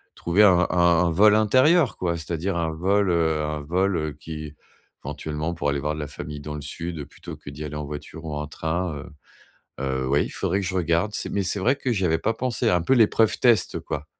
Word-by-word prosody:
trouver 90 Hz, +5 st, +2 dB
un 90 Hz, -3 st, +5 dB
un -, -, -1 dB, 0.3 s
un -, -, +2 dB
vol 105 Hz, +5 st, +5 dB
intérieur, 130 Hz, -, +4 dB
quoi. 85 Hz, -2 st, -1 dB
C'est-à-dire 85 Hz, +3 st, -3 dB
un 80 Hz, -1 st, -1 dB
vol, 95 Hz, +5 st, +1 dB
heu, 80 Hz, -2 st, +1 dB
un 75 Hz, 0 st, -3 dB
vol, 90 Hz, +5 st, 0 dB
heu, 80 Hz, -1 st, -2 dB
qui 75 Hz, 0 st, -8 dB, 0.5 s
éventuellement, 80 Hz, +2 st, -4 dB
pour 75 Hz, -3 st, -1 dB
aller 70 Hz, 0 st, 0 dB
voir 75 Hz, +2 st, -2 dB
de -, -, -6 dB
la 75 Hz, -, -4 dB
famille 75 Hz, 0 st, -7 dB
dans 75 Hz, +1 st, -6 dB
le 75 Hz, -, -6 dB
sud, 80 Hz, +1 st, -6 dB
plutôt -, -, -10 dB
que -, -, -11 dB
d'y 75 Hz, +2 st, -7 dB
aller 75 Hz, -1 st, -6 dB
en 75 Hz, 0 st, -4 dB
voiture 75 Hz, +2 st, -8 dB
ou 75 Hz, -2 st, -4 dB
en 75 Hz, 0 st, -4 dB
train, 80 Hz, +2 st, -3 dB
heu 70 Hz, +5 st, -9 dB, 0.7 s
heu, 65 Hz, -1 st, -1 dB
oui, 70 Hz, +2 st, +2 dB
il -, -, -7 dB
faudrait 100 Hz, -, -1 dB
que -, -, -3 dB
je 95 Hz, -, -3 dB
regarde. 85 Hz, +3 st, +1 dB
C'est -, -, -3 dB
mais 100 Hz, -, 0 dB
c'est 95 Hz, +2 st, -1 dB
vrai 125 Hz, +8 st, +2 dB
que 135 Hz, -2 st, -2 dB
j'y 95 Hz, -4 st, 0 dB
avais 80 Hz, -1 st, +1 dB
pas 115 Hz, -, 0 dB
pensé, 120 Hz, -1 st, -1 dB
un 90 Hz, -5 st, +2 dB
peu 85 Hz, -, +2 dB
l'épreuve 115 Hz, -2 st, +4 dB
test, 115 Hz, -7 st, +3 dB
quoi. 75 Hz, -1 st, -5 dB
85 Hz, 235 wpm, -24 LUFS, 75-100 Hz, 0.7 s, un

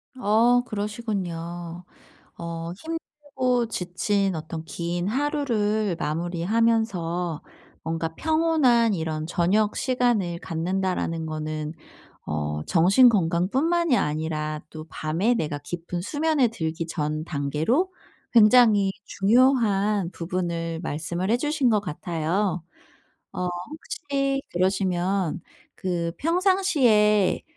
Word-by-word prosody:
어 245 Hz, +1 st, +3 dB
그러시군요. 180 Hz, -6 st, -4 dB, 0.5 s
어 170 Hz, 0 st, -5 dB
힘들고 280 Hz, -6 st, -2 dB
지친 190 Hz, +1 st, 0 dB
어떤 160 Hz, +1 st, -6 dB
긴 175 Hz, +2 st, -3 dB
하루를 220 Hz, -, 0 dB
마무리하면서 175 Hz, 0 st, 0 dB, 0.4 s
뭔가 165 Hz, 0 st, -3 dB
'평온한 315 Hz, -8 st, +3 dB
이런 160 Hz, -3 st, -3 dB
저녁 195 Hz, +5 st, +1 dB
시간을 240 Hz, -9 st, 0 dB
갖는다.'라는 170 Hz, -1 st, -2 dB
거는 155 Hz, 0 st, -4 dB, 0.5 s
어 75 Hz, 0 st, -2 dB
정신 195 Hz, +9 st, +6 dB
건강뿐만이 245 Hz, -, +2 dB
아니라 155 Hz, 0 st, -2 dB
또 155 Hz, 0 st, -9 dB
밤에 165 Hz, +12 st, 0 dB
내가 150 Hz, -6 st, -2 dB
깊은 175 Hz, +3 st, -5 dB
수면에 290 Hz, -, +1 dB
들기 165 Hz, -6 st, -3 dB
전 155 Hz, -1 st, -2 dB
단계로 160 Hz, -, 0 dB, 0.4 s
굉장히 215 Hz, -3 st, +6 dB
중요한 210 Hz, -4 st, +2 dB
부분을 170 Hz, -2 st, -3 dB
말씀을 170 Hz, +5 st, -3 dB
해 235 Hz, -, +4 dB
주신 295 Hz, -1 st, +1 dB
것 215 Hz, -2 st, +3 dB
같아요. 175 Hz, +1 st, -2 dB, 0.7 s
어 180 Hz, -, -2 dB
혹시 275 Hz, -, -3 dB
그러시면 185 Hz, -1 st, 0 dB, 0.3 s
그 170 Hz, -2 st, -2 dB
평상시에 290 Hz, -, +3 dB
190 Hz, 220 characters per minute, -25 LUFS, 165-240 Hz, 0.7 s, 정신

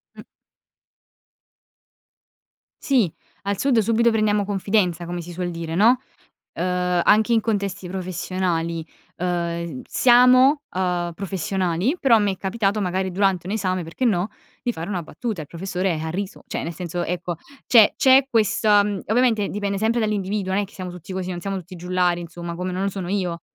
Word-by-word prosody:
Mh. -, -, -12 dB, 2.6 s
Sì, 240 Hz, -, +2 dB, 0.3 s
al 200 Hz, -1 st, -1 dB
sud 270 Hz, -3 st, +2 dB
subito 230 Hz, +2 st, +3 dB
prendiamo 210 Hz, -2 st, +2 dB
confidenza 195 Hz, -4 st, 0 dB
come 175 Hz, 0 st, -4 dB
si 175 Hz, +1 st, -9 dB
suol 175 Hz, 0 st, -3 dB
dire, 165 Hz, -1 st, -5 dB
no; 235 Hz, +7 st, +5 dB, 0.5 s
ehm, 180 Hz, 0 st, 0 dB
anche 220 Hz, +3 st, +4 dB
in 225 Hz, -, +5 dB
contesti 200 Hz, -4 st, -2 dB
professionali, 175 Hz, -2 st, -2 dB, 0.3 s
ehm, 170 Hz, -4 st, -2 dB
siamo, 255 Hz, +3 st, +5 dB
ehm, 180 Hz, -2 st, 0 dB
professionali 190 Hz, -, -1 dB
però 265 Hz, -5 st, +5 dB
a 220 Hz, -, +5 dB
me 205 Hz, -1 st, +1 dB
è 190 Hz, -, -6 dB
capitato, 205 Hz, +1 st, -1 dB
magari 185 Hz, 0 st, -1 dB
durante 185 Hz, -2 st, +1 dB
un 200 Hz, -, -2 dB
esame 185 Hz, -4 st, -1 dB
perché 170 Hz, +11 st, -3 dB
no, 200 Hz, -2 st, +1 dB, 0.3 s
di 245 Hz, -, -1 dB
fare 165 Hz, +4 st, -6 dB
una 185 Hz, -4 st, -2 dB
battuta. 205 Hz, +2 st, -5 dB
Il 145 Hz, -, -9 dB
professore 180 Hz, -1 st, -2 dB
ha 160 Hz, -, -3 dB
riso; 195 Hz, +3 st, -5 dB
cioè -, -, -3 dB
nel 170 Hz, -, -4 dB
senso, 175 Hz, +1 st, -4 dB
ecco, 175 Hz, 0 st, -3 dB, 0.3 s
c'è 225 Hz, -4 st, +7 dB
c'è 265 Hz, 0 st, +5 dB
questa 210 Hz, -2 st, +3 dB
mhmm, 205 Hz, -2 st, -2 dB
ovviamente 225 Hz, -2 st, +2 dB
dipende 200 Hz, -1 st, -2 dB
sempre 225 Hz, +3 st, +1 dB
dall'individuo 205 Hz, -2 st, -1 dB
non 205 Hz, -, +2 dB
è -, -, -4 dB
che 195 Hz, -, -20 dB
siamo 185 Hz, -2 st, -6 dB
tutti 180 Hz, +1 st, -9 dB
così, 185 Hz, 0 st, -3 dB
non 175 Hz, -, -4 dB
siamo 195 Hz, +2 st, -3 dB
tutti 185 Hz, +1 st, -9 dB
giullari, 180 Hz, 0 st, 0 dB
insomma, 170 Hz, 0 st, -7 dB
come 180 Hz, +1 st, -3 dB
non 185 Hz, +2 st, -2 dB
lo 200 Hz, -, +1 dB
sono 190 Hz, -2 st, -5 dB
io. 180 Hz, -4 st, -2 dB
190 Hz, 175 wpm, -22 LUFS, 175-210 Hz, 2.6 s, c'è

